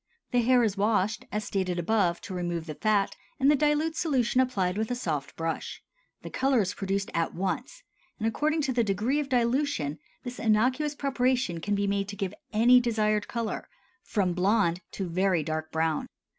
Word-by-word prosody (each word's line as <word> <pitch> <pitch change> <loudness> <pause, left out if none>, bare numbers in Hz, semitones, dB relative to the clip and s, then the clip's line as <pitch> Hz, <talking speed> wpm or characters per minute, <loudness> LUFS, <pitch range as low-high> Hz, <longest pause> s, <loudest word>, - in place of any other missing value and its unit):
The 245 -1 +3
hair 245 +1 +4
is 210 -3 0
washed, 210 0 +1
as 210 0 -2
stated 185 -3 -1
above, 175 -1 +1
to 210 - -7
remove 175 -2 -2
the 155 - -5
fat, 205 +3 +1 0.2
and 275 +2 +5
the - - +5
dilute 300 +2 +1
solution 260 -7 +2
applied 195 -8 0
with 220 +1 -1
a 245 - -1
soft 155 - -3
brush; 165 0 -4 0.4
the - - -7
color 265 -1 +2
is 195 0 -1
produced 195 0 -2
at 165 +1 -1
once 195 - -3 0.3
and 220 - -1
according 305 +7 +1
to 265 -2 0
the 240 -1 +2
degree 215 +8 0
of 290 -2 -3
dilution 240 - 0 0.2
this 245 -1 -7
innocuous 255 +7 +2
preparation 255 -9 0
can 205 +3 0
be 200 0 0
made 200 0 0
to 200 - -6
give 195 -2 -3 0.2
any 235 +3 +6
desired 215 -3 +1
color 230 -2 -4 0.3
from 190 -4 0
blond 185 -1 +2
to 195 - -3
very 180 -1 +1
dark 155 +1 -3
brown. 160 -1 0
215 Hz, 185 wpm, -28 LUFS, 185-250 Hz, 0.4 s, any